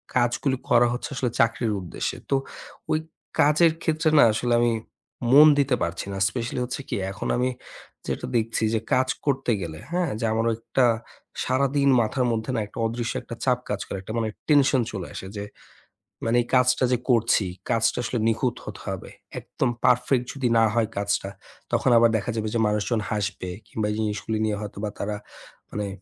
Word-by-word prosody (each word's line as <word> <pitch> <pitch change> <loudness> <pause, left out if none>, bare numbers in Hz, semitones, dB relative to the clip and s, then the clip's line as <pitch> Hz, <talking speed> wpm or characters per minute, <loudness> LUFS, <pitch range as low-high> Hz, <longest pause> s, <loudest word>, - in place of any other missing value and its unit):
কাজগুলি 125 +2 +1
করা 120 0 +6
হচ্ছে 125 - -4
আসলে 125 -3 -1
চাকরির 115 -1 +1
উদ্দেশ্যে। 85 - -4
তো 135 - +3 0.6
ওই 155 - +3 0.4
কাজের 155 +3 +5
ক্ষেত্রে 160 0 +1
না - - +9
আসলে 120 +2 0
আমি 120 -1 +3 0.6
মন 150 +3 +9
দিতে 135 -2 +3
পারছি 85 +2 -3
না। - - -4
specially 120 0 -3
হচ্ছে 125 +3 -5
কি - - -1 0.2
এখন - - -5
আমি 125 +1 +1 0.6
যেটা - - -3
দেখছি 115 0 -1
যে 110 - +2
কাজ 130 0 +3 0.2
করতে 135 -3 +1
গেলে, 80 -2 -6
হ্যাঁ, 175 -1 0
যে - - -1
আমার 115 +1 +1
একটা 125 +2 +1 0.6
সারাদিন 140 +2 +2
মাথার 125 +4 0
মধ্যে 110 +2 -2
না - - +1
একটা - - -9
অদৃশ্য 115 +1 -3
একটা - - -7
চাপ - - +3
কাজ - - -1
করে। - - -4
একটা 110 +3 -7
মানে 110 -1 -1 0.2
tension 140 -3 +5
চলে 95 -4 -5
আসে 95 - -6
যে, 100 - -3 0.8
মানে 115 +2 +2
এই - - -16
কাজটা 125 0 +3
যে 125 - +3
করছি, 115 -4 +3 0.3
কাজটা 115 0 +2
আসলে 120 0 -2
নিখুঁত 115 +2 +1
হতে - - -8
হবে। - - -5 0.3
একদম 130 - -2 0.2
perfect 125 +1 +3
যদি 135 -3 -1
না - - +5
হয় 115 -2 +1
কাজটা 100 -1 0 0.4
তখন - - +2
আবার 115 0 +6
দেখা 120 +4 -3
যাবে 110 -1 -1
যে - - +2
মানুষজন 105 +2 0
হাসবে 100 -3 -2 0.2
কিংবা 105 -1 -2
এই - - -2
জিনিসগুলি 110 +1 -2
নিয়ে 105 -1 -1
হয়তোবা 105 0 -4
তারা 105 0 -2 0.5
মানে 105 -1 -3
120 Hz, 180 wpm, -25 LUFS, 110-130 Hz, 0.8 s, না